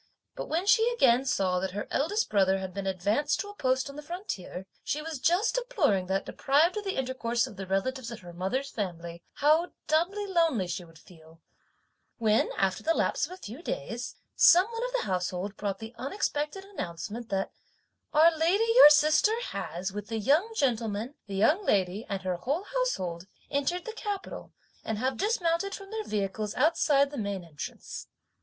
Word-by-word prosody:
But - - -6
when 335 +4 0
she 450 +3 +5
again 260 - +4
saw 185 -8 +1
that 185 0 -3
her 205 - -3
eldest 410 +10 +1
brother 195 -2 +3
had 190 -1 -5
been 195 0 -4
advanced 205 - 0
to 410 - -7
a 410 - -10
post 260 -5 +1
on 280 - -9
the 300 - -6
frontier, 295 - -6 0.2
she 300 - -1
was 310 -2 -5
just 350 - +2
deploring 390 - +1
that, 195 +1 0
deprived 300 +7 +2
of 425 - -3
the 390 - -2
intercourse 245 -3 0
of - - -10
the 195 0 -7
relatives 235 +6 -1
of 235 - -8
her 175 -1 -11
mother's 250 +11 -2
family, 170 -4 -5
how 310 +4 +3
doubly 350 +7 +1
lonely 330 - +2
she 175 +1 -4
would 165 -1 -16
feel; 160 -1 -18 0.8
when, 220 -2 +2
after 190 -1 +1
the 330 +1 +1
lapse - - +1
of - - -15
a - - -9
few 240 - -9
days, 235 - -4 0.2
some 360 +2 +7
one 460 +1 -3
of - - -4
the - - +1
household 185 +2 -2
brought 200 -1 -3
the 225 +2 -9
unexpected 300 +4 -2
announcement 225 - -6
that 195 -1 -1 0.6
"our 320 +2 +6
lady, 345 +8 +3
your - - +11
sister, 305 +9 +4
has, 185 +3 -4
with 210 0 -5
the 225 - -3
young 295 - +2
gentleman, 230 - 0
the 200 - -5
young 300 - +3
lady 195 - +1
and 195 -2 -3
her 185 -1 -1
whole 285 - -2
household, 195 - -2 0.2
entered 290 +6 -1
the 450 - -5
capital 410 -3 -5 0.3
and 220 - -2
have 260 +4 0
dismounted 390 - 0
from 395 0 -11
their 440 0 -3
vehicles 210 - -2
outside 285 -1 +3
the 290 - -6
main 200 -3 -3
entrance." 155 -4 -8
260 Hz, 185 wpm, -29 LUFS, -, 0.8 s, your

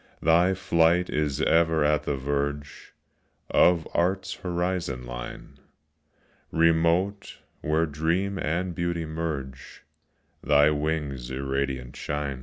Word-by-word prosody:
Thy 85 +4 +4
flight 90 -1 +2
is 75 -1 -1
ever 80 -2 +3
at 75 0 +1
the 70 - 0
verge 70 +2 -4 0.6
Of 85 -2 +4
Art's 95 +2 0
horizon 85 -8 -3
line; - - -8 0.9
Remote, 85 +4 +1 0.2
where 80 +3 +1
dream 85 +6 -1
and 90 +3 -1
beauty 85 -1 -2
merge, 75 -5 -5 0.6
Thy 75 +1 +5
wings 75 -4 -2
irradiant 65 -1 -3
shine. 70 -2 -3
80 Hz, 100 wpm, -26 LUFS, 70-85 Hz, 0.9 s, Thy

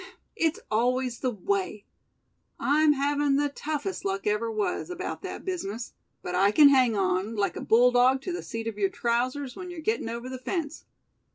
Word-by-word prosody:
It's 325 -5 0
always 250 +2 +1
the 255 - 0
way. 200 -1 -2 0.7
I'm 300 +1 +4
havin' 285 0 +1
the 290 +1 +1
toughest 305 +6 -4
luck 195 0 -2
ever 210 +2 0
was, 215 - -2
about 360 +1 -5
that - - -7
business; 240 - -4 0.3
but 180 - -4
I 195 +3 +4
can 285 +7 +7
hang 255 -5 +4
on, 190 +3 0
like 200 -4 0
a - - -5
bulldog 250 +3 +4
to 365 - -3
the 355 - -4
seat 225 0 -6
of 220 -2 -5
your 195 -1 +2
trousers 255 +4 -1
when 365 -1 -7
you're 350 -2 -7
gettin' 230 -5 -1
over 235 +2 -5
the 260 0 -6
fence. 310 +2 -4
250 Hz, 180 wpm, -27 LUFS, 215-290 Hz, 0.7 s, can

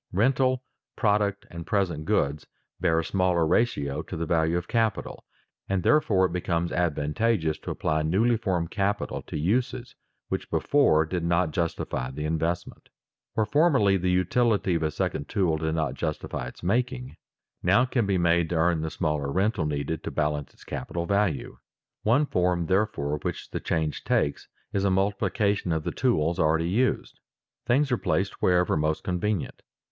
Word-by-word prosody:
Rental, 130 +5 +2 0.3
product, 105 -2 +1
and 85 0 -6
present 90 -8 0
goods, 70 0 0 0.3
bear 80 - +2
a - - -6
smaller 90 -2 +2
ratio 75 -8 +1
to 90 - -7
the 85 - -2
value 80 +1 +1
of 90 0 -4
capital, 115 -2 -1 0.4
and 95 -2 0
therefore 105 -11 +4
it 85 - -2
becomes 85 -1 -1
advantageous 80 +2 0
to - - -8
apply 80 0 0
newly 100 +10 +2
formed 95 -7 -1
capital 100 0 -1
to - - -6
uses 120 +9 -1 0.3
which - - -3
before 80 - +3
did 85 +2 -3
not 85 0 +1
justify 80 -6 -2
the 75 +3 -5
investment. 80 +2 -2 0.5
Where 110 - +2
formerly 130 - +3
the 90 -1 0
utility 100 +2 +2
of 85 - 0
a 80 - +1
second 70 -1 -3
tool 90 -6 +1
did 80 0 -1
not 80 -1 -1
justify 60 - -4
its 60 - -12
making, 125 +6 -1 0.5
now 100 +8 +4
it 130 - -4
can 120 -6 +1
be 100 -2 +2
made 85 -1 +2
to 85 - -1
earn 80 0 +2
the 80 - -2
smaller 75 -4 -1
rental 95 -2 +1
needed 75 +1 -3
to - - -3
balance 75 -1 -1
its - - -19
capital 85 -1 -4
value. 100 -6 0 0.4
One 125 +7 +3
form, 90 -7 +1
therefore, 80 -6 0
which - - -5
the - - -3
change 80 -3 -2
takes, 70 - 0 0.3
is 100 - 0
a 100 - +3
multiplication 100 0 0
of 80 -1 0
the - - -2
tools 85 - +1
already 80 +1 +2
used. 125 +7 0 0.5
Things 135 +3 +2
are 125 - +3
placed 95 +1 -1
wherever 90 -1 +3
most 75 0 0
convenient. 90 +1 -2
90 Hz, 165 wpm, -26 LUFS, 80-105 Hz, 0.5 s, therefore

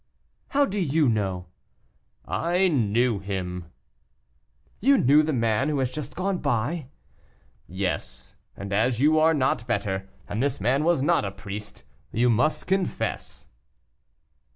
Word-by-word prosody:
"How 285 +1 +3
do 205 -5 -3
you 155 -3 +2
know?" 95 -6 -1 0.8
"I 180 +3 +1
knew 120 - +1
him." 90 -2 -4 1.1
"You 275 +5 +4
knew 145 - +5
the 155 +1 -1
man 115 +1 +1
who 150 - 0
has 130 -2 0
just 150 -2 -6
gone?" 160 - -1 0.8
"Yes; 90 -9 -4 0.2
and 100 0 -5
as 115 +3 +1
you 155 +3 +4
are 160 +1 +4
not 130 -4 0
better, 95 -4 -2 0.2
and 105 +3 -2
this 140 +1 0
man 130 +8 +1
was 165 -5 +2
not 145 - +3
a 100 - -2
priest, 100 +1 -8 0.3
you 120 +2 +2
must 130 +8 +1
confess." 190 0 -2
125 Hz, 130 wpm, -25 LUFS, 100-155 Hz, 1.1 s, knew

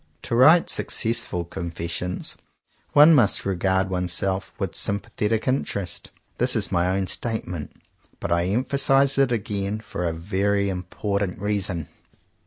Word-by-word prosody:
"To 115 - -2
write 155 +8 +6
successful 110 -7 0
confessions 85 +1 -4 0.6
one 150 +3 +8
must 120 -9 +3
regard 95 0 0
oneself 95 +1 -1
with - - -3
sympathetic 105 +2 -1
in 130 +2 +2
terest." 95 -4 -5 0.3
This - - +3
is - - 0
my 85 +1 +2
own 95 +1 0
statement; 90 -7 -3 0.5
but - - -4
I 85 0 +2
emphasize 135 +5 +2
it 135 -2 +3
again 105 -2 -2
for 95 -4 -5
a - - 0
very 100 +4 0
important 95 +1 -3
reason. 100 -5 -1
100 Hz, 130 wpm, -24 LUFS, 90-110 Hz, 0.6 s, one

